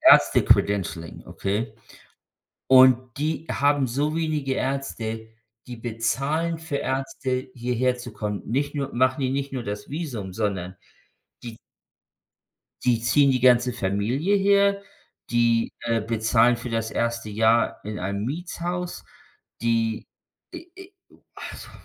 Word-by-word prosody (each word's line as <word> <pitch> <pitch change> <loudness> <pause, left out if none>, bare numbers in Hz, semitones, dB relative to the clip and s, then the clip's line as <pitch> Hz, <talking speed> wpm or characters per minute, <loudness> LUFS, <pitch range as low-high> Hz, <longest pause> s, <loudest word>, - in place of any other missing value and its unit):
Ärzte-Credentialing, 90 -5 +4
okay? 105 +3 -2 1.0
Und 130 -1 +8 0.2
die 155 +2 -2
haben 145 -1 +2
so 145 +6 -1
wenige 155 -4 -1
Ärzte, 115 -5 -3 0.4
die 125 - -6
bezahlen 135 +9 -1
für 160 -3 -4
Ärzte 130 -1 -2
hierher 125 +1 0
zu 120 -1 -8
kommen. 105 -1 -4
Nicht 140 +5 -1
nur 140 -2 -3
machen 130 +2 +2
die 130 - +1
nicht 140 +1 -2
nur 130 -2 -3
das 105 0 -5
Visum, 125 - -5
sondern 95 -3 -2 0.7
die 115 -1 -8 1.3
die 120 -2 +3
ziehen 140 +4 +4
die 130 - +1
ganze 125 0 +5
Familie 120 - 0
her. 200 0 +3 0.5
Die, 115 -1 +2
äh, 115 -1 0
bezahlen 115 +2 +2
für 115 +1 -7
das 115 0 -1
erste 115 -1 -1
Jahr 110 +2 +2
in 105 0 -5
einem 100 +3 -3
Mietshaus. 175 +4 -4 0.6
Die, 115 -1 0 0.5
äh, - - -9
äh, 385 0 -12 0.4
also - - -9
125 Hz, 125 wpm, -24 LUFS, 115-140 Hz, 1.3 s, Und